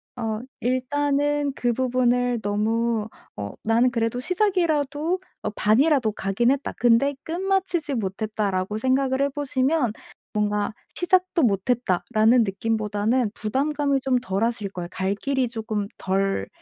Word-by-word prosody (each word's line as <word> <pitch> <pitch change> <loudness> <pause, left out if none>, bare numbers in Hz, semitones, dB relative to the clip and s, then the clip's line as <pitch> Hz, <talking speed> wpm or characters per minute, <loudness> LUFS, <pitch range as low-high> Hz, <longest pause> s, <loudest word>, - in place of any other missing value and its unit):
어 225 -3 -2 0.2
일단은 285 +3 0
그 240 -1 0
부분을 245 -1 +1
너무 220 +2 0 0.3
'어 100 -1 -5
나는 230 +3 +3
그래도 230 0 -1
시작이라도 335 -2 +1 0.2
어 - - -1
반이라도 245 +3 +3
가긴 200 +5 +1
했다. 280 0 -1
근데 245 +4 +3
끝마치지 355 -3 -1
못했다.'라고 205 -1 -2
생각을 265 +2 +1
해 280 - +2
보시면 275 -3 0 0.4
뭔가 210 0 0 0.2
'시작도 365 -2 +2
못 200 -1 +1
했다.'라는 230 +1 +3
느낌보다는 215 +2 0
부담감이 280 +5 0
좀 255 -1 +1
덜하실 225 -1 -1
거예요. 175 -2 -5
갈 190 +1 -1
길이 265 +2 0
쪼끔 220 -3 -3
덜 195 +1 0
245 Hz, 290 characters per minute, -24 LUFS, 215-280 Hz, 0.4 s, 나는